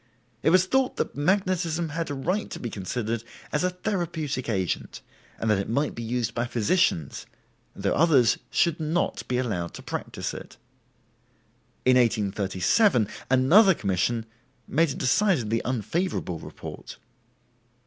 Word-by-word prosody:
It - - +3
was 185 +2 +5
thought 260 +5 +1
that - - -2
magnetism 175 0 0
had 165 +1 -3
a 145 - -3
right 180 +10 -1
to - - -6
be 120 - -5
considered 110 +3 -3 0.3
as 150 - 0
a 180 - +3
therapeutic 170 - -3
agent, 95 -5 -2 0.3
and 115 - -3
that 105 -3 +3
it 100 - -3
might 140 +6 0
be 115 - -6
used 115 0 -2
by 120 0 -1
physicians, 115 - 0 0.5
though - - 0
others 140 - +4
should 170 -2 +1
not 160 +3 -1
be 125 - 0
allowed 100 -10 -2
to - - -9
practice - - -4
it. - - -10 1.3
In 130 0 +6
1837 105 - +2 0.2
another 165 - +6
commission 105 - 0 0.4
made 165 +3 +2
a 135 - -3
decidedly 125 - +1
unfavorable 125 - -2
report. - - -9
130 Hz, 140 wpm, -26 LUFS, 110-175 Hz, 1.3 s, In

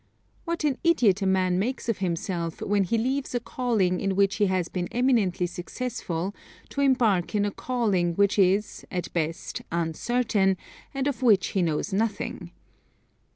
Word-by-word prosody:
What 335 -1 -2
an 285 -4 +1
idiot 235 - +4
a 195 - +1
man 185 -1 +2
makes 245 +6 -2
of 230 -4 0
himself 170 -2 -2
when 200 -1 +1
he 230 +6 0
leaves 260 +3 -1
a - - +2
calling 230 -7 0
in 195 -1 0
which 195 0 +2
he 205 - +3
has 185 -2 0
been 175 -1 -3
eminently 230 -8 +2
successful 180 -1 -4 0.4
to 280 - -2
embark 225 -9 +2
in 205 0 +2
a 205 - -1
calling 200 -9 0
which 200 +2 +2
is, 200 +3 +2
at 180 -1 -4
best, 165 -1 -3
uncertain, 190 +4 +1 0.3
and 270 -1 -2
of 280 -2 -2
which 215 -7 +4
he 195 - 0
knows 165 +4 -1
nothing. 215 +2 -2
200 Hz, 160 wpm, -26 LUFS, 180-245 Hz, 0.4 s, idiot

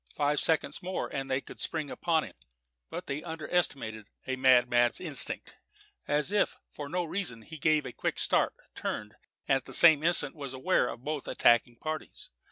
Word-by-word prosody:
Five 145 0 +1
seconds 150 -3 0
more 185 +1 -3
and 135 -1 -3
they 130 0 0
could - - -12
spring 155 -4 -2
upon 165 -3 +1
him. - - -9 0.6
But - - -6
they 140 +2 -4
under 160 -2 -6
estimated 110 -11 -1 0.2
a 130 - -2
madman's 125 -2 +4
instinct. - - -2 0.5
As 150 +5 +2
if 210 - +1
for 145 -1 -7
no 180 +2 -1
reason, 165 - -3
he 160 +4 -10
gave 155 0 +2
a 125 - -6
quick - - -2
start, - - +1 0.2
turned, 105 0 -4 0.3
and 135 - +4
at 135 - -9
the - - 0
same 160 -4 +8
instant 170 +1 +3
was 140 -5 -7
aware 130 +1 +1
of 120 - -7
both 150 -1 -4
attacking 120 0 +3
parties. 155 +6 -7
145 Hz, 180 wpm, -29 LUFS, 130-160 Hz, 0.6 s, same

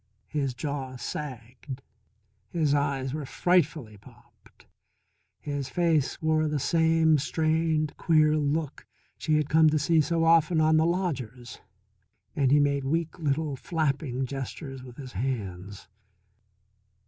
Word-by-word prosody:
His 140 -4 -2
jaw 135 -2 -4
sagged, 130 0 -7 0.7
his 155 -4 +1
eyes 140 -2 0
were 155 0 -3
frightfully 155 - +1
popped, 100 - -21 0.7
his 145 -2 -4
face 165 -3 +1
wore 155 0 +2
the 150 0 -1
same 160 +1 +3
strained, 155 +1 0
queer 155 -2 +3
look 150 0 -2 0.3
she 155 - +1
had 150 -2 0
come 160 0 +5
to 155 - +1
see 155 +2 +3
so 165 +3 0
often 165 0 +4
on 155 0 +4
the 160 +1 +3
lodger's, 130 - -3 0.8
and 135 -3 +2
he 145 +2 +5
made 140 -1 +1
weak 165 +4 -2
little 150 -1 -1
flapping 140 -4 -1
gestures 135 +1 -6
with 125 -1 -12
his 135 -3 -8
hands. 100 -5 -4
150 Hz, 125 wpm, -27 LUFS, 135-160 Hz, 0.8 s, come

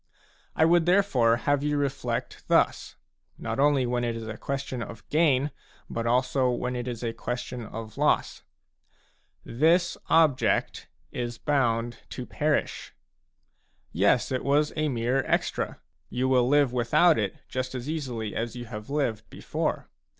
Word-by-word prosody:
I 160 - +4
would 170 0 +4
therefore 175 -12 +4
have 145 -1 +2
you 150 0 0
reflect 135 -4 -3
thus, - - +2 0.4
not - - -4
only 140 -2 +3
when 120 0 -1
it 120 -1 -1
is 115 -1 -6
a 110 - -5
question 135 -1 -4
of 115 -1 -8
gain, 150 -3 +3 0.4
but 115 0 -2
also 125 +2 +2
when 125 +1 -2
it 120 0 -4
is 120 -1 -5
a 115 -1 -2
question 120 -1 -5
of 110 -1 -8
loss. - - +1 1.0
"This 165 +8 +2
object 155 -5 +2 0.2
is 120 -1 -4
bound 120 -4 0
to - - -6
perish.,, - - -1 1.0
Yes, - - +2
it 130 - -1
was 145 +2 +2
a 155 -1 0
mere 125 +1 0
extra; - - -1 0.3
you 130 +1 -1
will 125 -2 +3
live 145 -3 +3
without 125 +7 +4
it 100 -3 -1
just 130 0 -4
as 125 +1 -5
easily 125 -9 -4
as 115 +1 -3
you 120 -1 -6
have 105 -1 -8
lived 130 -7 -1
before. - - -3
125 Hz, 150 wpm, -27 LUFS, 120-145 Hz, 1.0 s, I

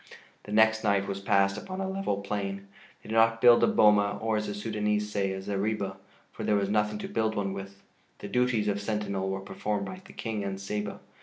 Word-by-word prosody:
The - - -8
next 110 +1 +4
night 100 -2 +2
was 100 0 -3
passed 100 +1 +2
upon 185 - -7
a 190 - -1
level 190 - -2
plain. 100 -1 -3 0.4
They - - -12
did - - -3
not 115 0 +4
build 120 0 +7
a - - +6
boma, 105 - +4
or, 110 0 0
as 105 0 -1
the 105 - -3
Sudânese 105 0 -1
say, 100 -2 -1
a 95 - -4
zareba, 100 0 -2 0.3
for - - -7
there 105 - +2
was 100 -1 +1
nothing 105 0 +1
to - - -5
build 110 -1 0
one 100 -1 -1
with. 100 0 -8 0.3
The - - -7
duties 120 0 +1
of 100 0 0
sentinel 100 -2 -2
were 95 0 -3
performed 100 +1 -3
by 185 0 -8
the 195 - -14
King 110 -3 -3
and 95 -1 -4
Saba. 105 +1 -4
105 Hz, 220 wpm, -28 LUFS, 100-110 Hz, 0.4 s, build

